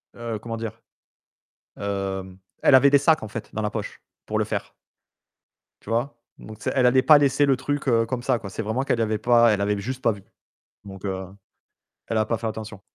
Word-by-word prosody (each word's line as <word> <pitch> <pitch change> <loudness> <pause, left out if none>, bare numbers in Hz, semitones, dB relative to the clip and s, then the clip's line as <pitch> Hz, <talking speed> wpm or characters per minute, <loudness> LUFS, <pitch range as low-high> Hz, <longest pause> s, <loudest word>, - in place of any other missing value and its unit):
heu, 115 -2 -5
comment 115 +1 -5
dire? 115 -2 -6 1.0
Heu, 95 -2 -4 0.3
elle 135 - +6
avait 140 +2 +7
des 140 - +6
sacs 155 -1 +3
en - - -5
fait 105 - -7
dans 110 - -2
la 105 - -1
poche 110 -2 -6 0.2
pour - - -2
le - - +1
faire - - -4 1.1
tu - - -12
vois? 120 +2 -1 0.2
Donc 110 0 -11
elle 130 -2 +3
allait 130 +1 +5
pas 150 +1 +7
laisser 140 0 +3
le 135 -2 +3
truc 145 +3 -2 0.2
comme 125 0 -3
ça, 125 -1 +1
quoi. 100 - -8
C'est 95 - -5
vraiment 110 +5 -1
qu'elle 115 -4 0
avait 110 -1 0
pas 120 0 +4
elle 100 - -1
avait 105 +1 0
juste 130 +5 -5
pas 115 - +3
vu, 100 -3 -9 0.6
donc 95 -1 -10
heu, 95 -1 -3 0.8
elle 115 - -2
a 110 - +3
pas 115 - -1
fait 115 - -4
attention. 110 -2 -6
115 Hz, 210 wpm, -24 LUFS, 105-130 Hz, 1.1 s, avait